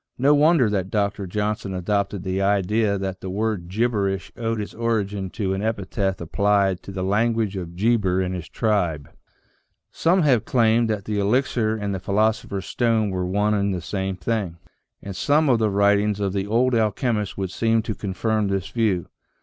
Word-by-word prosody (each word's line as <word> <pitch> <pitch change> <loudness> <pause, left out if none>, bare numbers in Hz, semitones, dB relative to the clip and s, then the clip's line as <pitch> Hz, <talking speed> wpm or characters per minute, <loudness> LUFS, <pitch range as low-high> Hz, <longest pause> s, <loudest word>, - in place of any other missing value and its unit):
No 140 +4 +4
wonder 150 -3 +4
that 95 -3 -1
Dr. 100 -2 -1
John 105 +3 -1
son 95 -2 -6
adopted 100 +1 -1
the 95 0 -1
idea 100 +1 +1
that 95 -1 -4
the 95 - -5
word 105 -2 -2
gibberish 100 -3 -1
(anciently - - -12
written 115 - -1
gcberisJi] - - +1
owed 110 - -2
its 105 - -7
origin 105 -4 -1
to 95 -1 -2
an 95 - -2
epithet 100 -3 -2
applied 100 +1 +1
to - - -9
the 95 -1 -4
language 110 +1 +1
of 85 -3 -6
Geber 100 -2 +2
and 95 0 -1
his 85 -2 -6
tribe. 90 -10 -1 0.8
Some 175 +2 +2
have 130 -7 +3
claimed 115 -1 +2
that 105 -3 -2
the 105 -1 -1
elixir 110 +1 +1
and 100 -2 -3
the 95 - -3
philosopher's 100 0 0
stone 115 -4 +1
were 90 -1 -2
one 105 +3 +1
and 100 -2 0
the - - -3
same 95 +2 -3
thing, 95 -3 -2 0.5
and 100 -1 -6
some 150 +9 +2
of 120 -3 +4
the 110 -1 +2
writ 100 0 +3
ings 105 0 -1
of 100 -2 -1
the 100 0 -2
old 125 +4 +2
alchemists 110 -1 0
would 95 -2 -3
seem 115 +3 +1
to 110 - -3
confirm 105 +2 -1
this 100 0 -2
view. 105 -7 0
100 Hz, 195 wpm, -23 LUFS, 95-110 Hz, 0.8 s, No